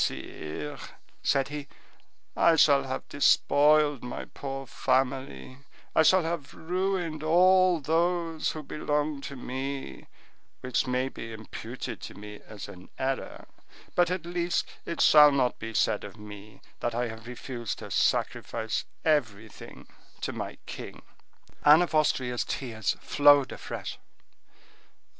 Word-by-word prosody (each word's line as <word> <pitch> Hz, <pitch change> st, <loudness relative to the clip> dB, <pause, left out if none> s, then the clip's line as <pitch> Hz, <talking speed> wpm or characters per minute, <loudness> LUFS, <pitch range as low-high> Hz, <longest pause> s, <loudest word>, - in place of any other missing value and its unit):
"Sire," 135 Hz, -, -4 dB, 0.4 s
said 135 Hz, 0 st, +1 dB
he, 145 Hz, -1 st, -6 dB, 0.7 s
"I 165 Hz, -, +5 dB
shall 140 Hz, -3 st, +5 dB
have 130 Hz, 0 st, -5 dB
despoiled 145 Hz, 0 st, +4 dB
my 125 Hz, -, -6 dB
poor 135 Hz, -1 st, -6 dB
family; 130 Hz, -, -1 dB, 0.4 s
I -, -, +6 dB
shall 185 Hz, +3 st, +5 dB
have 165 Hz, -3 st, -4 dB
ruined 180 Hz, -2 st, -2 dB
all 180 Hz, +2 st, +5 dB
who 165 Hz, 0 st, 0 dB
belong 150 Hz, 0 st, -1 dB
to 140 Hz, -, -7 dB
me, 135 Hz, +2 st, -5 dB, 0.5 s
which 125 Hz, +1 st, 0 dB
may 125 Hz, +1 st, 0 dB
be 115 Hz, -3 st, -8 dB
imputed 110 Hz, 0 st, -7 dB
to -, -, -8 dB
me 105 Hz, 0 st, -10 dB
as 105 Hz, -2 st, -8 dB
an 90 Hz, 0 st, -12 dB
error; 135 Hz, 0 st, -3 dB, 0.5 s
but, 175 Hz, -1 st, +3 dB
at 180 Hz, -2 st, -2 dB
least, 175 Hz, 0 st, -1 dB, 0.2 s
it 170 Hz, -, -2 dB
shall 150 Hz, -1 st, +8 dB
not 130 Hz, -3 st, +1 dB
be 115 Hz, +1 st, -5 dB
said -, -, +2 dB
of -, -, -9 dB
me 105 Hz, 0 st, -12 dB, 0.2 s
that 120 Hz, -1 st, -2 dB
I 120 Hz, 0 st, 0 dB
have 110 Hz, +1 st, -9 dB
refused 120 Hz, -2 st, -5 dB
to -, -, -9 dB
sacrifice 110 Hz, -1 st, 0 dB, 0.2 s
everything 110 Hz, -9 st, -2 dB, 0.4 s
to -, -, -3 dB
my -, -, -5 dB
king." -, -, -8 dB, 0.6 s
Anne 150 Hz, +4 st, +8 dB
of 175 Hz, -, -4 dB
Austria's 130 Hz, -5 st, +1 dB
tears 115 Hz, -6 st, -2 dB
flowed 145 Hz, -2 st, +5 dB
afresh. -, -, -6 dB
140 Hz, 130 wpm, -28 LUFS, 125-160 Hz, 0.7 s, shall